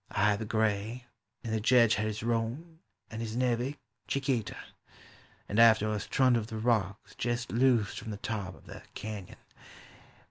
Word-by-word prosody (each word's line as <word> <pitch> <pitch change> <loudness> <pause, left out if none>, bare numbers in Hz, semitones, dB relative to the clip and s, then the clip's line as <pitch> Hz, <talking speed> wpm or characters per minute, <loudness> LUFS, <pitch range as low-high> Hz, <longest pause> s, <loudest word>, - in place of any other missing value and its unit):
I 105 0 +2
had 105 - -1
the 110 - -4
gray, 110 +2 -1 0.4
and 115 - -3
the 110 - +1
Jedge 115 0 +5
had 110 +2 0
his 110 0 -4
roan, 120 +9 -2 0.3
and 110 - -6
li - - -2
is 110 - -6
nevey, 125 +3 0 0.3
Chiquita; 135 -5 -1 0.9
And 105 - 0
after 110 -2 +6
us 105 -1 -3
trundled 120 -4 +2
the 110 - -6
rocks 110 -4 0
jest 120 0 -2
loosed 120 -4 +2
from - - -8
the 105 - -4
top 100 -4 -4
of - - -19
the - - -10
canon. 105 -4 -6
110 Hz, 170 wpm, -30 LUFS, 105-120 Hz, 0.9 s, after